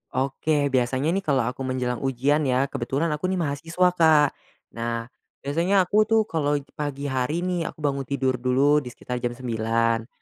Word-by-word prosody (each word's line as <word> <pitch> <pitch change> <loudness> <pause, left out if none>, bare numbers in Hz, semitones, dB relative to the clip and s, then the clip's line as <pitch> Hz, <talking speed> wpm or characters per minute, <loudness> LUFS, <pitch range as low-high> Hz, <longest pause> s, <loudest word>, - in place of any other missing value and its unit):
Oke, 140 +2 0
biasanya 130 +4 +1
nih 195 - +1
kalau 140 -9 +1
aku 130 +2 -4
menjelang 125 -1 -2
ujian 135 +3 +1
ya, 130 +1 +2
kebetulan 140 +7 -1
aku 150 +5 -1
nih 190 - 0
mahasiswa, 165 +5 +1
Kak. 160 -4 +5 0.4
Nah, 115 0 -3 0.4
biasanya 175 +7 +2
aku 215 +4 +2
tuh 225 -1 +4
kalau 150 -6 0 0.2
pagi 145 -1 -3
hari 130 +7 -1
nih, 180 -3 -1
aku 155 - -9
bangun 140 -2 -1
tidur 130 -2 0
dulu 135 +4 +3
di 140 - -9
sekitar 125 0 -5
jam 120 0 -3
9.00 115 -1 0
140 Hz, 170 wpm, -24 LUFS, 125-155 Hz, 0.4 s, Kak